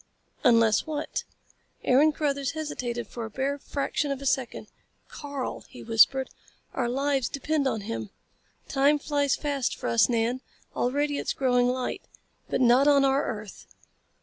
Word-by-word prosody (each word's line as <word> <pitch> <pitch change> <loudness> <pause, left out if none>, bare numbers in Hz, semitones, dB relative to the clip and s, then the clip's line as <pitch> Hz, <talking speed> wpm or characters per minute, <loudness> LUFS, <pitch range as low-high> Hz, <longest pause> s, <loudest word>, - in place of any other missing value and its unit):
"Unless 230 -4 +4
what?" 300 -1 -3 0.6
Aaron 285 +5 +5
Carruthers 280 -3 -1
hesitated 250 -7 -4
for 235 +3 -7
a 225 - -5
bare 275 +5 -2
fraction 285 +1 -2
of 275 -1 -2
a 275 - -8
second. 260 -2 -1 0.4
"Karl!" 285 -3 -6
he - - -11
whispered. 235 +4 +4 0.4
"Our 240 -2 -1
lives 275 0 0
depend 285 0 -1
on 225 -5 -1
him. 115 - -5 0.6
Time 280 +2 +3
flies 285 -1 0
fast 285 -4 -2
for - - -4
us, 115 - +4
Nan. 240 +2 0 0.3
Already 285 +3 0
it - - -6
is - - +1
growing 245 -2 +2
light. 250 0 -2 0.5
But - - 0
not 250 +3 +5
on 280 -1 +5
our 275 +1 +2
earth. 210 -3 -7
265 Hz, 150 wpm, -27 LUFS, 240-285 Hz, 0.6 s, Aaron